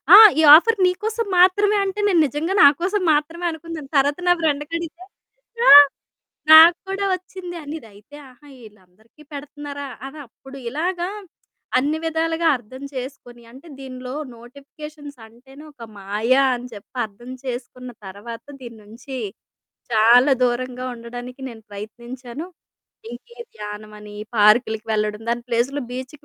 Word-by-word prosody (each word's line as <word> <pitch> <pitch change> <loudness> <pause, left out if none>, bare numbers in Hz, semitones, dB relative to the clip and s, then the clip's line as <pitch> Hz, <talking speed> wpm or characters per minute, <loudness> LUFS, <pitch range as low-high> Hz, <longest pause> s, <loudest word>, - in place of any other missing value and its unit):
ఆ! - - +12 0.2
"ఈ - - +5
ఆఫర్ 450 +7 +3
నీకోసం 425 +5 -1
మాత్రమే" 410 +3 +4
అంటే 390 +2 -4
నేను 355 -4 +3
నిజంగా 300 +7 -3
నాకోసం 355 +8 +3
మాత్రమే 325 +4 -2
అనుకున్నాను. 320 -3 -9
తర్వాత 285 +4 +1
నా 355 - +6
ఫ్రెండ్‌కి 295 0 -2
అడిగితే, 335 +1 -8 0.7
"ఆ! - - +9 0.8
నాకు 330 +2 +9
కూడా 395 +1 -2
వచ్చింది," 365 -1 -7
అనీది, 295 -4 -8
అయితే 210 +8 -17
"ఆహా! 270 +4 -20 0.2
ఈళ్ళందరికీ 210 +7 -21
పెడుతున్నారా," 285 0 -8 0.2
అని 300 +3 -11
అప్పుడు 270 +4 -14
ఇలాగా 350 +6 -3 0.7
అన్ని 295 +4 0
విధాలుగా 325 +1 -1
అర్థం 255 +4 -13
చేసుకొని, 250 -2 -8
అంటే 270 +7 -15
దీనిలో 255 -1 -8 0.2
నోటిఫికేషన్స్ 285 +3 -12
అంటేనే 265 +6 -17
ఒక 240 -5 -14
మాయ 210 +5 -1 0.2
అని 245 +1 -8
చెప్పి 205 +5 -13
అర్థం 240 +5 -13
చేసుకున్న 250 0 -7 0.2
తర్వాత, 220 +4 -10 0.2
దీని 235 -2 -10
నుంచి 240 +5 -10 0.8
చాలా 240 +5 +5
దూరంగా 250 +1 -2
ఉండడానికి 245 +2 -10
నేను 225 -2 -12
ప్రయత్నించాను. 240 - -9 0.6
ఇంకే 470 - -13 0.2
ధ్యానమని, 210 0 -9 0.2
పార్కులకి 215 +1 +3
వెళ్లడం 210 0 -2
దాని 240 0 -2
ప్లేస్‌లో 250 +5 -1
బీచ్‌కి 260 +3 -8
270 Hz, 130 wpm, -21 LUFS, 235-320 Hz, 0.8 s, ఆ